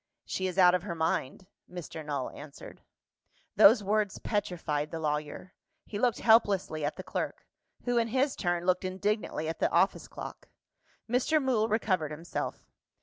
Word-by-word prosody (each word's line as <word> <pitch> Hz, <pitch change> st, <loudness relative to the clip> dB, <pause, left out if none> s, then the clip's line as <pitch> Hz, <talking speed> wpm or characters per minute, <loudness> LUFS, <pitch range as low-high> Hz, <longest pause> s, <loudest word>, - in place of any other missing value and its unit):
"She 190 Hz, -, -2 dB
is 185 Hz, 0 st, -5 dB
out 180 Hz, -2 st, +7 dB
of 180 Hz, -, +2 dB
her 175 Hz, -2 st, -5 dB
mind," 160 Hz, +1 st, -1 dB, 0.3 s
Mr. 170 Hz, -3 st, -7 dB
Null 145 Hz, -3 st, -3 dB
answered. 145 Hz, -1 st, -11 dB, 0.7 s
Those 210 Hz, 0 st, +7 dB
words 210 Hz, 0 st, 0 dB
petrified 160 Hz, -8 st, -2 dB
the 165 Hz, -, -5 dB
lawyer: 150 Hz, +3 st, -3 dB, 0.3 s
he 205 Hz, -, -5 dB
looked 245 Hz, -1 st, +1 dB
helplessly 200 Hz, -8 st, +3 dB
at 145 Hz, -, -1 dB
the -, -, -7 dB
clerk -, -, -4 dB, 0.4 s
who, 245 Hz, -1 st, +2 dB
in 230 Hz, -, +1 dB
his 265 Hz, +4 st, +1 dB
turn, 175 Hz, -2 st, -1 dB
looked 185 Hz, 0 st, +2 dB
indignantly 190 Hz, -3 st, -2 dB
at 165 Hz, -, -4 dB
the -, -, +2 dB
office -, -, +2 dB
clock. -, -, -9 dB, 0.6 s
Mr. 250 Hz, +7 st, +2 dB
Mool 250 Hz, -6 st, +1 dB
recovered 190 Hz, -7 st, +1 dB
himself. 160 Hz, +3 st, -5 dB
185 Hz, 155 wpm, -30 LUFS, 160-215 Hz, 0.7 s, out